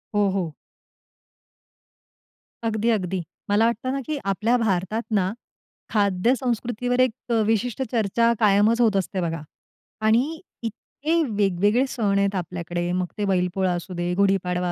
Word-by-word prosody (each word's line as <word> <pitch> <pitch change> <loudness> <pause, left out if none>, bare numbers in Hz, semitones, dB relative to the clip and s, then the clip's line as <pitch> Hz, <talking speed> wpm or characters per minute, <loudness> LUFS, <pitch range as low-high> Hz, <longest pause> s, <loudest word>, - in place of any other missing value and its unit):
हो, 205 -1 +3
हो. 180 -5 -2 2.1
अगदी, 225 0 0
अगदी. 190 -5 0 0.3
मला 205 +2 +4
वाटत 235 -1 +1
ना, 270 +2 -1
की 310 -1 -2
आपल्या 210 +5 +1
भारतात 215 0 0
ना 190 -2 +2 0.6
खाद्यसंस्कृतीवर 240 +4 0
एक 255 -3 +3 0.2
अ, - - +3
विशिष्ट 225 +3 0
चर्चा 230 +1 +2
कायमच 215 +2 +4
होत 220 -4 +4
असते 190 0 -1
बघा 165 -2 -2 0.7
आणि 260 +9 +2 0.2
इतके 295 +8 -2
वेगवेगळे 205 +4 +2
सण 205 -6 0
आहेत 200 0 +1
आपल्याकडे 175 -1 -3
मग 180 0 0
ते 210 - 0
बैलपोळा 185 -1 +1
असू 175 +2 -5
दे, 175 0 -1
गुढीपाडवा 180 -2 +1
205 Hz, 130 wpm, -24 LUFS, 185-230 Hz, 2.1 s, मला